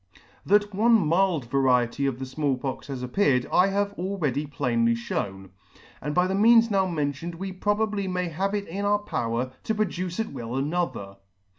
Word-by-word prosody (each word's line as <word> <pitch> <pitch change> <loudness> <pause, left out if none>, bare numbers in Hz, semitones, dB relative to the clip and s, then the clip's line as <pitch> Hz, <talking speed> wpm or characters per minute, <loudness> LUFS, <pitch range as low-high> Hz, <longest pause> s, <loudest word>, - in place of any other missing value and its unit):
That 205 +1 +3
one 225 +4 +3
mild 175 - +2
variety 130 0 +2
of 130 -3 -2
the 130 - -5
Small 135 0 -1
Pox 130 0 -5
has 135 -3 -5
appeared, 125 -2 +2
I 180 - +5
have 200 +1 0
already 160 -7 -1
plainly 115 -5 +1
fhewn 95 -4 -4 0.3
*; - - -25
and 150 0 -3
by 180 0 +4
the 185 - -1
means 230 +3 +5
now 190 -2 +2
mentioned 160 0 -3
we 190 +3 -5
probably 205 +1 -1
may 180 -1 -2
have 195 +5 -1
it 200 -1 -3
in 195 +5 -4
our 205 0 +3
power 120 - -2
to 220 - -1
produce 185 -3 -2
at 225 - -2
will 120 -2 -5
another. 135 - -2
170 Hz, 180 wpm, -26 LUFS, 130-200 Hz, 0.3 s, I